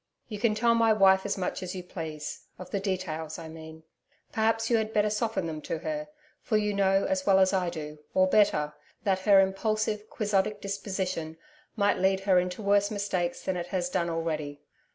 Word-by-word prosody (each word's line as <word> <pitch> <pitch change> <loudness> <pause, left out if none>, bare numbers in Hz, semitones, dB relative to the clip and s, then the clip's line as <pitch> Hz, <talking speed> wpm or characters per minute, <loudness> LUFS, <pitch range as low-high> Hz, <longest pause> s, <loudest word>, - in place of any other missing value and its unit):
You 210 -3 -5
can 215 0 +2
tell 230 +2 +3
my 230 -1 +4
wife 190 -2 +5
as - - -1
much 185 - -3
as 185 0 -5
you 180 - -5
please 160 -4 -7
of 185 0 -10
the 200 - 0
details, 180 -5 -3
I 165 -2 -8
mean. 160 0 -11 0.5
Perhaps, 225 0 +1
you 235 - +3
had 220 0 -2
better 210 0 +2
soften 220 -3 -1
them 155 -2 -5
to 165 - -3
her, 300 - -4 0.3
for 215 - +1
you 210 -1 0
know 195 -1 +2
as 190 0 0
well 195 -1 +6
as 190 0 +4
I 185 -2 +1
do 150 -3 -7 0.2
or 185 - +5
better 185 -7 +3 0.3
that 195 -3 +1
her 195 0 +6
impulsive, 210 +2 0
quixotic 210 -1 0
disposition 190 -5 -3 0.4
might 205 -3 +2
lead 190 +1 +2
her 190 -2 +4
into 180 +3 -3
worse 200 0 +3
mistakes 190 -4 -2
than 190 - -1
it 175 -1 -4
has 180 -1 -2
done 170 0 0
already. 155 -3 -3
190 Hz, 195 wpm, -28 LUFS, 175-210 Hz, 0.5 s, well